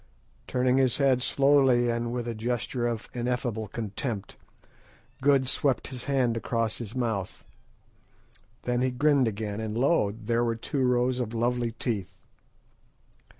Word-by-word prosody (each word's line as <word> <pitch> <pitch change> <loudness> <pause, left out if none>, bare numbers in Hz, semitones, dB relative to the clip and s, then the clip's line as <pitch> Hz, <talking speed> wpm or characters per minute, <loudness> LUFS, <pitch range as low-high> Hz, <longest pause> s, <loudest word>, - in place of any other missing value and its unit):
Turning 125 +1 +2
his 130 -3 +2
head 135 -3 +3
slowly 135 -3 +4
and 115 0 -2
with 120 -1 -3
a 120 - -2
gesture 120 +1 -2
of 115 -2 -3
ineffable 120 -3 -2
contempt, 105 0 -4 0.9
Good 135 -1 +4
swept 135 0 0
his 125 -2 -8
hand 130 -4 +1
across 115 -1 -1
his 115 0 -7
mouth. 110 -7 -2 1.2
Then 125 0 0
he 130 - +2
grinned 135 0 +3
again, 105 -1 -3
and 110 0 -3
lo, 135 -4 +3
there 115 +2 -1
were 115 -1 0
two 135 +4 -3
rows 125 0 +2
of 115 -2 -3
lovely 120 0 0
teeth. 110 -5 -3
120 Hz, 140 wpm, -27 LUFS, 115-130 Hz, 1.2 s, slowly